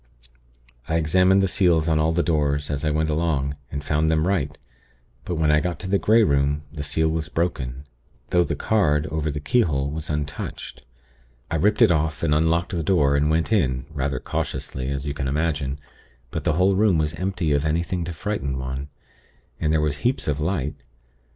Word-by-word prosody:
"I 80 Hz, -, +1 dB
examined 90 Hz, +4 st, +4 dB
the -, -, +3 dB
seals 85 Hz, -4 st, +2 dB
on 80 Hz, -1 st, +2 dB
all 80 Hz, +1 st, +2 dB
the 85 Hz, +1 st, +1 dB
doors, 75 Hz, -3 st, 0 dB
as 70 Hz, +1 st, -2 dB
I 75 Hz, -, +1 dB
went 80 Hz, +1 st, 0 dB
along, 75 Hz, -3 st, 0 dB, 0.2 s
and 70 Hz, 0 st, -4 dB
found 75 Hz, +1 st, +1 dB
them 80 Hz, 0 st, +2 dB
right; 80 Hz, -6 st, -1 dB, 0.7 s
but 90 Hz, -, -2 dB
when 80 Hz, -1 st, +2 dB
I 75 Hz, -, +5 dB
got 90 Hz, +1 st, -2 dB
to 95 Hz, -, -5 dB
the 100 Hz, +1 st, +2 dB
Grey 110 Hz, +2 st, +4 dB
Room, 70 Hz, -2 st, +1 dB
the 75 Hz, -, -5 dB
seal 80 Hz, +3 st, 0 dB
was 80 Hz, -1 st, -2 dB
broken; 70 Hz, -6 st, -2 dB, 0.5 s
though 90 Hz, 0 st, +4 dB
the -, -, -2 dB
card, 75 Hz, -9 st, +1 dB
over 80 Hz, 0 st, -1 dB
the 75 Hz, 0 st, -3 dB
keyhole, 75 Hz, -, +1 dB
was 80 Hz, +1 st, -5 dB
untouched. 75 Hz, -1 st, -5 dB, 0.7 s
I 85 Hz, -, +1 dB
ripped 105 Hz, +8 st, +3 dB
it 110 Hz, -, +5 dB
off, 80 Hz, 0 st, 0 dB
and 75 Hz, -2 st, +2 dB
unlocked 80 Hz, +3 st, +1 dB
the 85 Hz, -, -1 dB
door, 75 Hz, -5 st, +3 dB
and 75 Hz, +1 st, +2 dB
went 80 Hz, +7 st, +1 dB
in, 65 Hz, -10 st, +1 dB
rather 70 Hz, -3 st, -2 dB
cautiously, 65 Hz, 0 st, -4 dB
as 70 Hz, 0 st, -3 dB
you 70 Hz, -, -2 dB
can 65 Hz, -2 st, -3 dB
imagine; 75 Hz, -1 st, -1 dB, 0.5 s
but -, -, -4 dB
the -, -, +2 dB
whole 95 Hz, +4 st, +3 dB
room 100 Hz, -3 st, +3 dB
was 75 Hz, 0 st, 0 dB
empty 90 Hz, -2 st, -2 dB
of 70 Hz, 0 st, +2 dB
anything 85 Hz, +3 st, -1 dB
to 85 Hz, -, -4 dB
frighten 80 Hz, -6 st, -3 dB
one, 65 Hz, +2 st, -4 dB, 0.7 s
and 75 Hz, -1 st, +1 dB
there 80 Hz, -1 st, +2 dB
was 75 Hz, -1 st, 0 dB
heaps 125 Hz, -, 0 dB
of 75 Hz, -1 st, 0 dB
light. 75 Hz, -3 st, -1 dB
80 Hz, 195 wpm, -23 LUFS, 70-85 Hz, 0.7 s, I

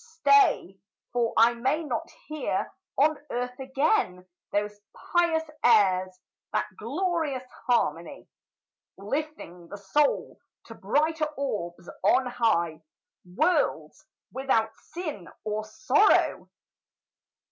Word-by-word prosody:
Stay, 280 Hz, -, +3 dB, 0.3 s
for 235 Hz, -2 st, +1 dB
I 230 Hz, +2 st, +6 dB
may 265 Hz, +7 st, 0 dB
not 245 Hz, -7 st, -3 dB, 0.2 s
hear 310 Hz, +5 st, -2 dB, 0.2 s
on 300 Hz, +2 st, +3 dB
earth 250 Hz, +1 st, -3 dB
again 265 Hz, -, 0 dB, 0.3 s
Those 205 Hz, 0 st, -2 dB, 0.3 s
pious 340 Hz, -2 st, +3 dB, 0.2 s
airs 185 Hz, -5 st, +4 dB, 0.3 s
that -, -, 0 dB
glorious 300 Hz, -, -2 dB, 0.2 s
harmony; 245 Hz, -1 st, 0 dB, 0.7 s
Lifting 205 Hz, -, -5 dB
the 205 Hz, -, -8 dB
soul 275 Hz, +10 st, 0 dB, 0.3 s
to -, -, -10 dB
brighter 310 Hz, +1 st, 0 dB
orbs 175 Hz, -11 st, -4 dB
on 255 Hz, +7 st, +4 dB
high, 170 Hz, -10 st, 0 dB, 0.5 s
Worlds 310 Hz, -, 0 dB, 0.3 s
without 230 Hz, -5 st, 0 dB
sin 310 Hz, -, -7 dB, 0.2 s
or 215 Hz, 0 st, -3 dB
sorrow! 255 Hz, -, +2 dB
250 Hz, 95 wpm, -27 LUFS, 205-305 Hz, 0.7 s, I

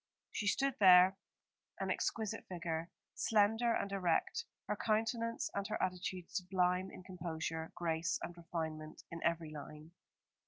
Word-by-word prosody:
She 210 Hz, -, -2 dB
stood 270 Hz, +6 st, +2 dB
there, 185 Hz, -1 st, +8 dB, 0.6 s
an -, -, 0 dB
exquisite 220 Hz, -3 st, -2 dB
figure, 170 Hz, -2 st, -3 dB, 0.2 s
slender 225 Hz, +2 st, +3 dB
and 200 Hz, -3 st, 0 dB
erect, 200 Hz, -, +1 dB, 0.2 s
her -, -, 0 dB
countenance 230 Hz, +1 st, 0 dB
and 200 Hz, -1 st, -1 dB
her 215 Hz, -, -2 dB
attitude 180 Hz, -1 st, -2 dB
sublime 185 Hz, 0 st, +1 dB
in -, -, -11 dB
composure, 165 Hz, -3 st, -4 dB
grace 170 Hz, -1 st, 0 dB
and 175 Hz, -, -5 dB
refinement 160 Hz, -2 st, -5 dB
in 170 Hz, -, -6 dB
every 170 Hz, -2 st, 0 dB
line. 150 Hz, +1 st, -9 dB
180 Hz, 130 wpm, -36 LUFS, 165-205 Hz, 0.6 s, there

